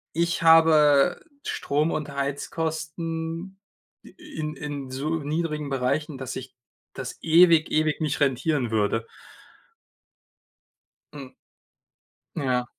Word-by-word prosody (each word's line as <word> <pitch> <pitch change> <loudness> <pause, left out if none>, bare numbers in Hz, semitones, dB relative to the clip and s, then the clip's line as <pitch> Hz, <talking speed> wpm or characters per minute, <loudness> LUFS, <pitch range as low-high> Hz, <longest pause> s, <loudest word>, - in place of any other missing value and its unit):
ich 170 +1 0
habe 160 -2 +5 0.2
Strom 150 +3 -1
und 150 -2 -3
Heizkosten 160 +5 -4 0.4
in 155 -4 -7
in 145 -2 -6
so 150 +5 -2
niedrigen 150 0 -3
Bereichen, 135 +3 -1
dass 130 -1 -5
sich 130 0 -8 0.4
das - - -7
ewig, 165 -1 +5
ewig 155 0 +1
nicht 150 -2 -1
rentieren 140 -2 +1
würde. 110 +1 0 2.1
Hm. 135 -3 -9 1.0
Ja. 130 -5 0
150 Hz, 95 wpm, -25 LUFS, 140-160 Hz, 2.1 s, habe